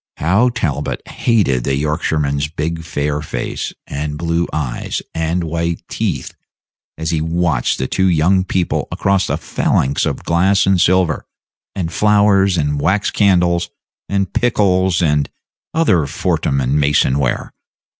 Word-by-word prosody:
How 100 +10 +3
Talbot 75 - -3
hated 95 - +1
the 70 +1 0
Yorkshireman's 75 -1 0
big 80 +2 -4
fair 75 -1 -2
face, 75 - -4
and 75 +1 -4
blue 85 +1 0
eyes, 70 -6 -3
and 80 +2 -1
white 85 +1 -3
teeth, - - -3 0.6
as 80 +1 -2
he 80 -2 0
watched 80 -5 0
the 65 - -2
two 95 +7 +1
young 90 +2 +3
people 95 -2 -1
across 100 -1 +1
a - - 0
phalanx 70 +2 0
of - - -3
glass 95 +4 +2
and 95 -2 +3
silver, 90 -3 +2 0.5
and 85 -3 -3
flowers 100 -2 +3
and 75 -2 0
wax 95 +7 +1
candles, 90 -4 +2 0.4
and 100 -1 -1
pickles, 95 -7 +2
and 75 -3 +1 0.4
other 95 - +2
Fortnum 70 0 -1
and 65 +4 +1
Mason 70 -1 +2
ware! 65 -3 -1
85 Hz, 135 wpm, -17 LUFS, 75-95 Hz, 0.6 s, How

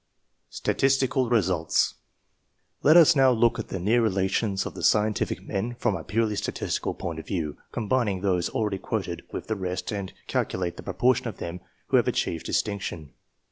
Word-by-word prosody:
STATISTICAL 135 -2 +1
RESULTS. 95 -8 +2 0.9
Let 155 +4 +7
us 165 -2 +7
now 135 -2 +6
look 120 -1 +3
at 115 - -4
the - - -4
near 110 +7 +2
relations 95 -1 0
of - - -5
the - - -8
scientific 105 0 +1
men 110 +5 -3
from 110 - 0
a 85 - -5
purely 110 +3 0
statistical - - -2
point 80 -2 -5
of 80 - -10
view, 80 -6 -3
combining 110 -4 0
those 90 -3 +1
already 105 -3 -1
quoted - - -3
with - - -5
the 110 - -2
rest, 90 -2 -3
and 100 -3 -4
calculate 90 -2 -1
the - - -7
proportion 120 +6 +1
of 110 - -6
them 85 +2 -5 0.3
who - - +5
have - - +2
achieved 80 - -1
distinction. 100 -7 -2
105 Hz, 170 wpm, -26 LUFS, 90-120 Hz, 0.9 s, Let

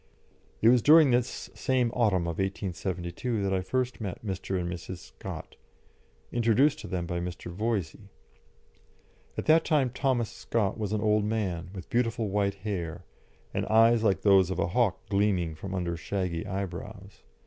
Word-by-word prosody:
It 115 - +8
was 125 0 +5
during 155 0 +7
this 120 -5 -1
same 125 +2 +1
autumn 105 -8 +2
of 85 0 -3
1872 95 +2 -2
that 95 0 0
I 95 - +1
first 125 +5 -2
met 100 +1 -5
Mr. 95 -1 -2
and 90 - -2
Mrs. 90 +1 -6
Scott, - - -9 0.7
introduced 120 +6 +3
to - - -8
them 90 -3 -2
by 85 0 -3
Mr. 90 0 -6
Voysey. 100 -1 -3 1.3
At - - -3
that 160 +1 +5
time 140 -5 +2
Thomas 125 -3 0
Scott 105 -5 -1
was 105 -2 -2
an 105 -1 0
old 105 -1 +2
man, 95 -6 -2
with 90 -3 -8
beautiful 115 -2 0
white 100 0 0
hair, 90 -4 -4 0.5
and - - -1
eyes 115 +1 +5
like 100 -3 +2
those 95 -3 +5
of 95 - -2
a 85 - 0
hawk 110 0 +1
gleaming 100 -5 +1
from 95 +5 -6
under 85 -2 -2
shaggy 90 0 -3
eyebrows. 100 +1 -6
100 Hz, 160 wpm, -28 LUFS, 90-115 Hz, 1.3 s, It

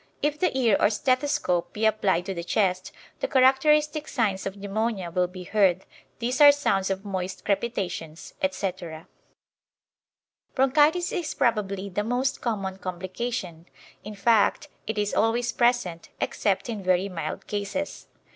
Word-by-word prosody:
If 295 0 0
the 360 -6 +1
ear 235 -6 +4
or - - +4
stethoscope 225 -6 0
be 215 +1 -1
applied 195 -5 +2
to 195 - -3
the 170 -2 -5
chest, 185 +1 0 0.3
the - - -1
characteristic 300 - +3
signs 205 -8 -1
of 195 +1 -6
pneumonia 200 -2 -2
will 180 +1 +1
be 180 0 -9
heard; 190 -2 +2 0.3
these 245 +4 -1
are 290 -1 +11
sounds 195 -10 0
of 195 +1 -3
moist 190 -2 -4
crepitations, 185 -7 -3
etc. 185 -4 -3 1.5
Bronchitis 295 +6 +3
is 335 -3 -3
probably 200 -6 0
the 200 +2 -2
most 250 +4 -1
common 195 -5 -3
complication; 185 -1 -5 0.4
in 210 +1 -8
fact, 225 +7 +2 0.2
it 220 0 -3
is 205 0 0
always 235 +2 +1
present, 235 -9 0
except 195 -2 0
in 220 -4 -4
very 185 +1 +2
mild 180 -4 -5
cases. 205 +8 -4
205 Hz, 140 wpm, -26 LUFS, 185-245 Hz, 1.5 s, are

